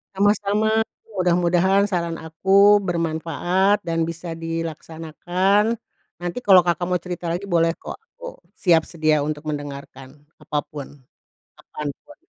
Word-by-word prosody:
Sama-sama 205 +2 +2 0.3
mudah-mudahan 180 +2 +2
saran 170 -2 -1
aku 195 +6 +4
bermanfaat 175 +3 0
dan 165 -1 -1
bisa 170 +1 -6
dilaksanakan, 165 +5 -1 0.4
nanti 175 +7 -4
kalau 190 -6 +6
Kakak 175 0 0
mau 180 - 0
cerita 180 -1 -4
lagi 175 +4 -2
boleh 170 -3 +1
kok - - -9
aku - - -12 0.2
siap 165 -4 +3
sedia 155 -2 +1
untuk 150 0 -4
mendengarkan 140 -2 -7 0.2
apa 150 -1 -2
pun, 145 -3 -7 0.7
kapan 150 -1 -7 0.2
pun 295 - -15
175 Hz, 120 wpm, -22 LUFS, 160-195 Hz, 0.7 s, kalau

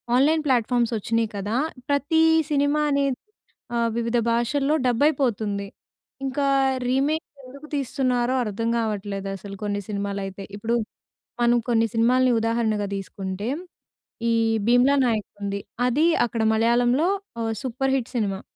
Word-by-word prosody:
Online 305 +5 +3
platforms 240 -2 +2
వచ్చినాయి 230 +1 0
కదా, 205 +3 -2 0.3
ప్రతీ 285 +3 +2 0.3
సినిమా 285 +1 +2
అనేది 280 -2 +1 0.6
ఆహ్, 235 0 +2
వివిధ 235 0 0
భాషల్లో 275 +6 +1
డబ్ 240 0 +1
అయిపోతుంది. 215 -9 -1 0.6
ఇంకా 275 +1 0 0.4
రీమేక్ 285 +5 +1 0.2
ఎందుకు 280 +4 -12
తీస్తున్నారో 255 -2 0
అర్థం 230 +1 -2
కావట్లేదు 205 -3 -3
అసలు 195 +1 -9
కొన్ని 205 -1 -1
సినిమాలు 200 -1 -3
అయితే. 195 0 -7
ఇప్పుడు 225 +3 -1 0.7
మనం 240 0 +4
కొన్ని 230 -1 +3
సినిమా‌లని 250 +3 +3
ఉదాహరణగా 225 -2 0
తీసుకుంటే, 195 +1 -5 0.8
ఈ - - +3 0.3
'భీమ్‌లా 250 +4 +5
నాయక్' 220 -4 0
ఉంది. 200 0 -2 0.3
అది 280 +6 +2 0.2
అక్కడ 230 0 -3
మలయాళంలో 240 +8 +3 0.3
ఓ - - -1 0.2
సూపర్ 265 +1 -1
హిట్ 245 -3 -2
సినిమా. 200 -4 -1
235 Hz, 125 wpm, -24 LUFS, 210-265 Hz, 0.8 s, భీమ్‌లా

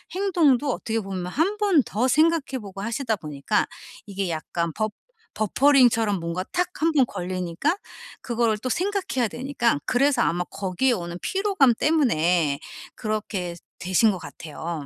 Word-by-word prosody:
행동도 310 -9 +3
어떻게 225 0 -2
보면 190 -3 -5
1 335 - 0
번 390 - +3
더 240 +5 0
생각해 310 -3 +2
보고 195 -1 -8
하시다 230 +1 -1
보니까 150 +5 -1 0.4
이게 195 -2 -3
약간 165 +1 -2
버 215 0 -1 0.5
버퍼링처럼 230 -3 +4
뭔가 170 +2 -3
탁 360 0 +1
1 330 - +3
번 270 -4 +5
걸리니까 185 - -2 0.4
그거를 235 -3 0
또 255 - -4
생각해야 355 - 0
되니까 240 - 0
그래서 275 +3 +2
아마 175 +1 +1
거기에 195 +7 -1
오는 175 -4 -4
피로감 385 - +3
때문에 175 - +2 0.4
그렇게 210 -5 -3 0.2
되신 185 +5 +3
것 190 - -4
같아요. 160 +1 -7
220 Hz, 305 characters per minute, -24 LUFS, 180-280 Hz, 0.5 s, 번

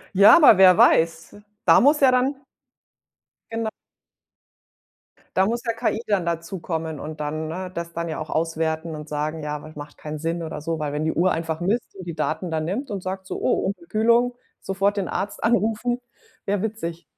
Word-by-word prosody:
Ja, 200 - +9
aber 230 - +7
wer 185 -2 +8
weiß? 165 +4 +3 0.3
Da - - +7
muss 290 +3 +5
ja 270 -2 +6
dann 255 +3 +2 1.2
Genau. 225 -1 -2 1.7
Da 190 +1 +4
muss 235 +2 -2
ja 230 - 0
KI 225 -1 -1
dann 200 -4 +1
dazukommen 165 -2 -3
und 155 0 -7
dann 155 +1 -3
ne? 180 +3 -5
Das 170 0 -5
dann 170 0 -3
ja 160 - -4
auch 155 - -6
auswerten 160 0 -1
und 150 0 -9
sagen, 150 +2 -3
ja, 150 0 -3
aber 150 +1 -9
macht 145 0 -10
keinen 150 0 -6
Sinn, 165 +2 -2
oder 155 -2 -6
so, 165 +2 -2
weil 150 -1 -3
wenn 150 +1 -2
die 160 - 0
Uhr 180 +2 +2
einfach 165 0 -2
misst 200 +5 -1
und 185 - -9
die 170 - -4
Daten 160 +2 -2
dann 155 -1 -1
nimmt 230 - -3
und 195 -2 -3
sagt 190 +1 -5
so, - - -5
oh, - - +1
Unterkühlung, 235 - +1 0.3
sofort 195 +1 0
den 195 - -1
Arzt 205 +1 -4
anrufen, 235 +2 +1 0.5
wäre 200 -1 0
witzig. 175 -6 -4
175 Hz, 190 wpm, -23 LUFS, 160-215 Hz, 1.7 s, Ja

